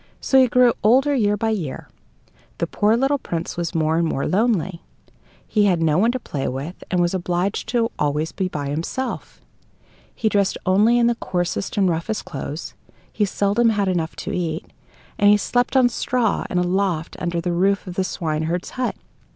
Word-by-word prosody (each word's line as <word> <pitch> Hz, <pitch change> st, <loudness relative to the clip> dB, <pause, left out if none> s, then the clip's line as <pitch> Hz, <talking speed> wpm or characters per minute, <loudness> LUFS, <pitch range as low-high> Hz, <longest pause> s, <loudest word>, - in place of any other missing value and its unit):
So 265 Hz, -, +3 dB
as 260 Hz, -, +7 dB
he -, -, -1 dB
grew 250 Hz, 0 st, +4 dB
older 265 Hz, +7 st, +4 dB
year 210 Hz, -6 st, +2 dB
by 225 Hz, +2 st, 0 dB
year, 170 Hz, -11 st, -4 dB, 0.7 s
the -, -, 0 dB
poor 215 Hz, +2 st, +2 dB
little 275 Hz, +3 st, +1 dB
Prince 170 Hz, -9 st, -4 dB
was 170 Hz, 0 st, -3 dB
more 160 Hz, 0 st, +1 dB
and 170 Hz, -, +1 dB
more 140 Hz, -3 st, -1 dB
lonely. 190 Hz, -4 st, 0 dB, 0.7 s
He 210 Hz, -2 st, +2 dB
had 180 Hz, -4 st, +3 dB
no 160 Hz, 0 st, +2 dB
one 230 Hz, +4 st, +3 dB
to 255 Hz, -, -2 dB
play 140 Hz, -, -4 dB
with, 140 Hz, +8 st, -5 dB
and 180 Hz, -, +1 dB
was 175 Hz, 0 st, +2 dB
obliged 180 Hz, +1 st, -1 dB
to 240 Hz, -2 st, +2 dB
be -, -, -37 dB
always 150 Hz, +2 st, 0 dB
by 155 Hz, -7 st, -3 dB
himself. 170 Hz, -, -4 dB, 0.7 s
He 220 Hz, -, -1 dB
dressed 200 Hz, -2 st, +1 dB
only 210 Hz, +6 st, +4 dB
in 240 Hz, -, +4 dB
the 235 Hz, -, +3 dB
coarsest 185 Hz, -2 st, -3 dB
and 195 Hz, -2 st, +3 dB
roughest 175 Hz, +6 st, -2 dB
clothes; 145 Hz, +3 st, -6 dB, 0.4 s
he 210 Hz, -, +1 dB
seldom 205 Hz, +4 st, +2 dB
had 205 Hz, -3 st, +1 dB
enough 170 Hz, -3 st, -1 dB
to -, -, -5 dB
eat, 170 Hz, 0 st, -2 dB, 0.5 s
and 205 Hz, -, +6 dB
he 205 Hz, -, +6 dB
slept 245 Hz, +5 st, +1 dB
on 255 Hz, -2 st, +6 dB
straw 245 Hz, -1 st, 0 dB
in 180 Hz, -, -1 dB
a 180 Hz, -, +3 dB
loft 180 Hz, -3 st, -1 dB
under 175 Hz, -1 st, -1 dB
the 175 Hz, +1 st, -1 dB
roof 195 Hz, +4 st, +1 dB
of 180 Hz, -, -6 dB
the 190 Hz, -, 0 dB
swineherd's 160 Hz, 0 st, -2 dB
hut. 255 Hz, -1 st, -2 dB
190 Hz, 190 wpm, -22 LUFS, 170-225 Hz, 0.7 s, as